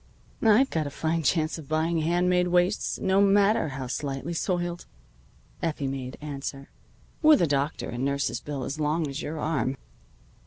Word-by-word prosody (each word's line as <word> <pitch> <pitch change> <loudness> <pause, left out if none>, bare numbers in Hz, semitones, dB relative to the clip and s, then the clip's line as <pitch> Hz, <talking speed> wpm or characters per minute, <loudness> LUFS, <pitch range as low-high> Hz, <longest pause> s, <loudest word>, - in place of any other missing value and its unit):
"I've 225 +4 +5
got 155 -3 -1
a - - -3
fine 160 +3 -1
chance 155 +2 +1
of 145 - -12
buying 160 +2 +1
hand 175 +3 +1
made 180 0 +3
waists, 180 +3 +1
no 190 +1 +2
matter 200 -1 +4
how 135 -2 -5
slightly 135 +4 -3
soiled," 175 0 -2 0.7
Effie 155 -4 -2
made 135 -1 -4
answer, 140 -2 -6 0.5
"with 310 -2 +7
a - - +4
doctor 145 0 -1
and 120 +2 -4
nurse's 140 -3 0
bill 145 -3 -5
as 145 +3 -4
long 155 +2 +1
as 140 +2 -5
your 155 +2 -4
arm." 135 -4 -1
155 Hz, 165 wpm, -27 LUFS, 140-175 Hz, 0.7 s, with